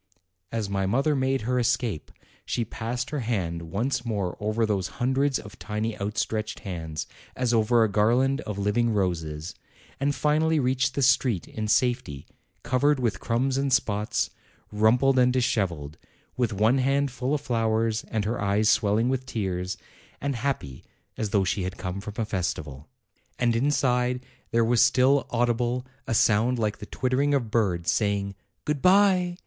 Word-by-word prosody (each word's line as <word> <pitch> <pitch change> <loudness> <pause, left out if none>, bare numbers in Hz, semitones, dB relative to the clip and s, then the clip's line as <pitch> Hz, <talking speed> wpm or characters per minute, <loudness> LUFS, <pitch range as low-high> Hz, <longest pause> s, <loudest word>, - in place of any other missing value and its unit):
As 110 -3 -2
my 100 -1 -1
mother 135 +8 +2
made 135 -1 0
her 125 +3 0
escape, 120 -7 -1 0.3
she 120 - -2
passed 120 +4 -4
her 150 - -2
hand 95 -9 -2
once 125 +7 -1
more 100 -6 -2
over 110 +2 0
those 100 -4 -1
hundreds 135 +2 +1
of 105 +2 -11
tiny 110 +1 -3
out 105 +2 -3
stretched 110 -1 -2
hands 80 -6 -5 0.3
as 125 -2 0
over 115 +1 +4
a - - +3
garland 125 +7 +2
of 105 -7 -5
living 105 +4 +1
roses, 85 -6 -2 0.5
and 140 +1 0
finally 155 +3 +2
reached 130 0 +1
the 140 - +1
street 125 -7 +2
in 110 -1 -4
safety, 120 - 0 0.4
covered 140 +3 +2
with 120 -4 -1
crumbs 130 +3 0
and 140 0 0
spots, 105 -4 0 0.4
rumpled 120 +5 +3
and 125 0 +4
dishevelled, 85 - -1 0.4
with 120 -3 0
one 110 +6 +2
hand 140 +1 +1
full 130 +3 -1
of 145 - -3
flowers 115 -3 0
and 110 -3 -2
her 115 +3 -2
eyes 100 +1 +2
swelling 110 +2 +3
with 130 0 -1
tears, 95 -6 -3 0.4
and 140 -1 -2
happy 115 - -3 0.3
as 110 - -2
though 100 -1 +2
she 95 +3 -1
had 95 +1 -4
come 90 +1 -4
from 105 +1 -8
a 115 - 0
festival. 80 -8 -4 0.5
And 120 -2 +2
inside 125 -1 +1 0.2
there 115 0 +2
was 120 0 +3
still 130 +2 +4
audible 120 +1 0 0.2
a 115 - 0
sound 115 +4 +3
like 105 -3 -1
the 105 - -8
twittering 135 +3 +1
of 120 -6 -2
birds, 95 -7 +1
saying: 100 -2 0 0.3
"Good 150 -2 -1
bye! 185 -2 +4
115 Hz, 165 wpm, -26 LUFS, 105-130 Hz, 0.5 s, over